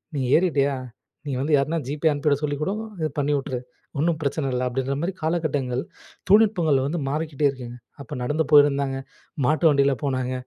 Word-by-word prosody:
நீ 140 - -1 0.2
ஏறிட்டியா! 145 -6 +1 0.5
நீ - - -2
வந்து 150 +3 0
யாருனா 150 +4 0
GPay 150 +3 +1
அனுப்பிவிட 145 0 +1
சொல்லிக் 145 0 -2
கூடோ, 190 +6 0 0.3
இது 155 - 0
பண்ணி 145 +1 +1
வுட்டுரு. 130 -2 -3 0.4
ஒன்னும் 160 +1 +1
பிரச்சனை 140 0 -1
இல்ல." 125 0 -1
அப்படீன்ற 135 +2 -2
மாரி 180 +3 -2
காலகட்டங்கள், 145 -6 -1 0.5
தொழில்நுட்பங்கள் 180 -10 +4
வந்து 160 +2 -2
மாறிக்கிட்டே 150 -1 0
இருக்குங்க. 125 -3 -7 0.3
அப்ப 140 - -10
நடந்து 150 +5 0
போயிருந்தாங்க, 140 -2 +4 0.5
மாட்டு 155 +3 +3
வண்டில 140 -1 +3
போனாங்க, 130 -2 -1
145 Hz, 160 wpm, -24 LUFS, 135-155 Hz, 0.5 s, தொழில்நுட்பங்கள்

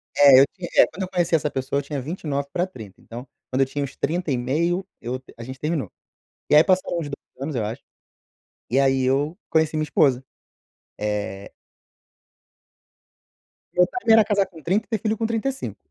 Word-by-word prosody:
É, 140 -2 +8
eu - - +7
tinha 185 -3 -7
é - - +9
quando 190 - -9
eu 185 - -5
conheci 175 -2 0
essa 150 -2 +1
pessoa 135 +1 -2
eu 145 - -4
tinha 140 0 -4
29 140 -1 -3
para 180 +1 0
30, 110 - -12
então, 120 +3 -9 0.2
quando 130 +1 +1
eu 135 - +5
tinha 140 +2 -3
uns 140 - -6
30 170 -2 -1
e 125 - +1
meio 170 +9 0 0.2
eu 125 +2 -4 0.2
a 115 - -8
gente 130 +2 -8
terminou. 155 -2 -2 0.6
E 150 - +5
aí 150 - +8
passaram 185 -1 +1
os 155 - -4
2 140 -2 -11
anos, 140 0 -3
eu 115 - 0
acho, 115 +6 -5 0.9
e 130 - +2
aí 135 -1 +3
eu 145 +7 +1
conheci 160 -1 +2
minha 155 - +1
esposa. 135 -4 +2 0.7
Eh 105 -2 -3 2.2
Meu 180 0 +4
timing 235 - +2
era 220 -1 +7
casar 200 -2 +2
com 175 -4 -14
30 195 +7 0
e - - -45
ter 220 -4 -1
filho 220 0 0
com 225 - -1
35. 230 +4 -2
150 Hz, 195 wpm, -23 LUFS, 130-180 Hz, 2.2 s, é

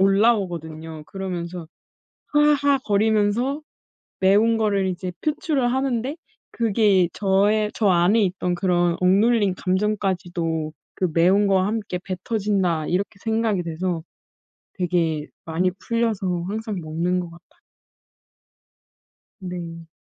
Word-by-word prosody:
올라오거든요. 175 -7 +1
그러면서 180 -3 -5 0.7
"하하." 295 -2 +4
거리면서 220 +5 +1 0.6
매운 210 +4 +4
거를 200 -3 +1
이제 185 0 -3
표출을 295 -5 0
하는데 265 0 -1 0.4
그게 210 -5 +3
'저의 210 +2 +2
저 215 - +1
안에 185 +5 +4
있던 180 -1 -1
그런 175 -2 +1
억눌린 200 +2 +3
감정까지도 185 -5 -1 0.2
그 185 - 0
매운 185 +5 +4
거와 190 -1 +3
함께 210 -4 -2
뱉어진다.' 190 -4 -1
이렇게 195 +2 -1
생각이 220 -4 0
돼서 170 0 -3 0.7
되게 165 -5 0 0.2
많이 170 +3 +1
풀려서 205 -7 -1
항상 215 0 -4
먹는 170 +3 -1
것 175 -1 -6
같아요. 170 +1 -19 1.8
네. 170 -3 -7
190 Hz, 245 characters per minute, -23 LUFS, 175-220 Hz, 1.8 s, 하하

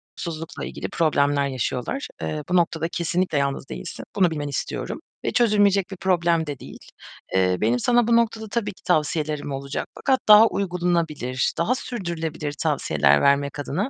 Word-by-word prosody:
uykusuzlukla 165 -1 -6
ilgili - - -6
problemler 145 -3 +2
yaşıyorlar. 130 - -3
Eee, 150 -1 -3
bu 180 - +1
noktada 165 -2 +1
kesinlikle 175 -1 -1
yalnız 140 -1 -1
değilsin. - - -7
Bunu 185 -4 +3
bilmeni 145 -2 -3
istiyorum. 140 - -4 0.3
Ve - - +1
çözülmeyecek 205 -4 +3
bir 190 - -6
problem 170 -3 +1
de 145 -3 -5
değil. - - -10 0.6
Eee, 90 -1 +3
benim 115 +3 +2
sana 240 - +3
bu 235 - +4
noktada 225 -1 +1
tabii 210 -2 -2
ki - - -25
tavsiyelerim 150 -3 0
olacak 140 +1 -4
fakat 265 -2 +1
daha 215 +1 +9
uygulanabilir, 170 - -1
daha 170 +10 +1
sürdürülebilir 165 - -4
tavsiyeler 75 - +2
vermek 140 +1 +2
adına 170 - -2
165 Hz, 155 wpm, -23 LUFS, 140-195 Hz, 0.6 s, daha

